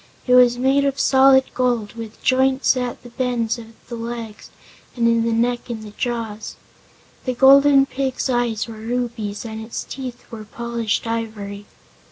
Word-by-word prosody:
It 250 - +2
was 245 -1 +6
made 270 +3 +2
of 275 0 -1
solid 265 0 +5
gold, 240 -5 0
with 225 -2 -9
joints 265 +1 +3
at 250 -1 -4
the 245 - -12
bends 235 -2 -1
of 225 - -10 0.2
the 245 - -9
legs 230 -2 -6 0.5
and 235 -2 +2
in 230 0 +3
the 230 - 0
neck 240 +2 0
and 215 -3 -7
jaws. 225 -3 -4 0.7
The 255 -1 -1
Golden 275 +1 +6
Pig's 270 -1 -2
eyes 240 -4 0
were 225 -1 -9
rubies, 225 -2 -4
and 220 -1 -6
its 220 - -5
teeth 255 -2 -8
were 220 -2 -7
polished 235 0 -3
ivory. 215 -3 -5
235 Hz, 160 wpm, -21 LUFS, 225-255 Hz, 0.7 s, was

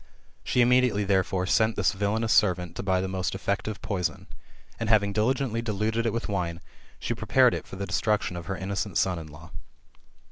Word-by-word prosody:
She 125 - +2
immediately, 125 -3 +3
therefore, 95 -1 +1
sent 110 +3 +2
this - - +2
villanous 105 +3 0
servant 90 -4 +2
to - - -4
buy 95 -1 +1
the 95 - -2
most 95 -1 -2
efiective 100 +2 -3
poison, 90 -7 -2 0.5
and, 115 -2 -2
having 100 -2 +3
diligently 115 +2 0
diluted 110 +1 -1
it - - +1
with 115 +2 -3
wine;, 90 -5 -2 0.4
she - - -2
prepared - - +3
it - - -5
for - - -9
the 100 +1 -4
destruction 105 -3 0
of 85 -1 -7
her 95 - -3
innocent 95 0 -3
son 90 -2 +1
in 80 - -9
law. 75 +2 -13
100 Hz, 185 wpm, -27 LUFS, 95-110 Hz, 0.5 s, immediately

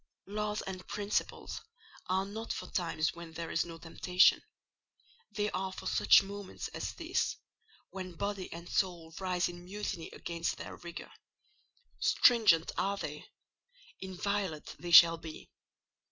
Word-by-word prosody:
Laws 210 +1 -2
and 185 -1 -7
principles 205 0 -2 0.5
are 190 +1 +1
not 220 +3 -5
for - - -4
the - - -13
times 165 -4 0
when 170 -1 -10
there 165 0 -5
is - - +1
no 165 -1 -8
temptation: 180 +3 +4 0.9
they 210 0 -1
are 190 0 -2
for - - -9
such - - +6
moments 200 0 -6
as - - -4
this, - - -1 0.6
when 185 -2 -6
body 200 +1 -3
and 170 +1 -8
soul 170 -4 -1
rise 185 -2 +1
in 175 0 -8
mutiny 190 -2 -4
against 170 0 -3
their - - -7
rigour; 170 -1 -8 0.9
stringent 215 -9 +5
are 200 +1 0
they; 150 -5 -5 0.7
inviolate 190 -3 -3
they 175 - -6
shall 165 -1 +9
be. 160 -1 -10
185 Hz, 140 wpm, -32 LUFS, 170-200 Hz, 0.9 s, shall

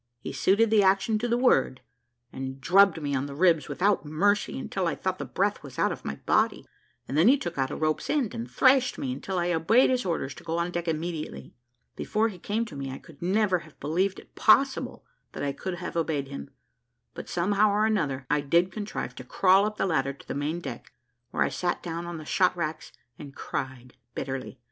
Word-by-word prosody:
He - - -6
suited 210 +4 +3
the 215 -2 +6
action 195 +3 +3
to 240 - -1
the 235 0 +1
word, 245 - +2 0.5
and 130 0 -5
drubbed 185 +4 +5
me 145 -2 -3
on 135 +1 -1
the 140 - -8
ribs 165 -2 +3
without 200 +2 +1
mercy, 165 - +1
until - - -2
I - - -1
thought - - -3
the - - -3
breath - - -1
was - - -11
out - - +2
of - - -7
my 70 - -4
body, - - +2 0.4
and 135 - -4
then 160 +7 +5
he 270 +4 +6
took 175 -10 -5
out 130 0 +1
a - - -4
rope's 155 0 -1
end 275 -8 0
and 230 +1 -5
thrashed 255 -1 +4
me 130 -2 -2
until 185 +8 -4
I 175 0 +1
obeyed 215 +12 +4
his 255 -1 +1
orders 165 -6 -2
to - - -13
go 165 0 -2
on 170 +1 -1
deck 175 0 -3
immediately. 160 0 -4 0.4
Before 220 +2 0
he 185 -4 -10
came 220 +6 -1
to 165 - -10
me, 135 -1 -5
I 130 - -6
could 155 -4 -17
never 190 +1 +2
have 160 -3 -17
believed 185 +6 0
it - - -14
possible 265 +5 +3 0.3
that - - -5
I 140 - 0
could 185 +5 -5
have 175 0 -6
obeyed 155 -5 -1
him; 70 0 -7 0.6
but - - -8
somehow 200 +4 +2
or 210 +1 +2
another 150 -12 0
I 150 +1 +1
did 170 +6 +2
contrive 205 - -5
to 130 - -7
crawl 190 +9 +4
up 215 0 -6
the - - +1
ladder 140 -6 0
to 140 - -17
the - - -3
main 150 +5 -2
deck, 120 - -8 0.4
where - - +1
I - - 0
sat 175 -1 -2
down 170 0 -4
on 170 -1 -5
the 155 - -9
shot 180 +3 +2
racks 155 -2 -4 0.3
and 140 -2 -10
cried 130 -2 -5 0.2
bitterly. 135 0 -5
170 Hz, 220 wpm, -27 LUFS, 145-205 Hz, 0.6 s, the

